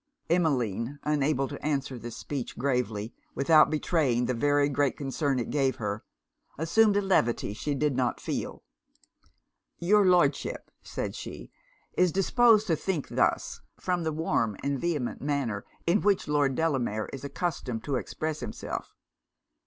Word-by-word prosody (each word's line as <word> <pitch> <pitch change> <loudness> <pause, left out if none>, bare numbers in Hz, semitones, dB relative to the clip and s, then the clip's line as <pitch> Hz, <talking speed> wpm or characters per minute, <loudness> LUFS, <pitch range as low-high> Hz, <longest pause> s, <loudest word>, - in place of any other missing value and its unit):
Emmeline, 135 - +1
unable 145 -2 +1
to 145 - -8
answer 135 -4 -1
this 120 0 -7
speech 135 -3 -5
gravely, 115 -4 -1 0.2
without 155 +2 +5
betraying 150 -6 +1
the 125 - 0
very 145 +3 +3
great 145 -1 0
concern 140 0 -1
it 120 - -2
gave 135 -3 +1
her, 105 -1 -3 0.5
assumed 205 +7 +3
a - - +3
levity 120 - +1
she 140 +7 -2
did 145 -1 +1
not 125 -2 0
feel. - - -4 1.1
'Your 205 +4 +4
Lordship,' 175 -7 +2
said - - -4
she, - - -8 0.4
'is 180 -1 +3
disposed 220 +3 +4
to 170 -6 +2
think 165 -2 -2
thus, - - 0 0.2
from 180 -1 -1
the 160 -1 -1
warm 115 -9 0
and 140 -2 -1
vehement 150 -8 -2
manner 135 -8 -1 0.2
in 175 +5 +3
which 200 -4 +2
Lord 145 -3 +2
Delamere 130 -9 0
is 135 - -7
accustomed 140 -6 -3
to 140 -3 -1
express 155 +4 -3
himself. 120 -3 -6
145 Hz, 145 wpm, -28 LUFS, 125-165 Hz, 1.1 s, without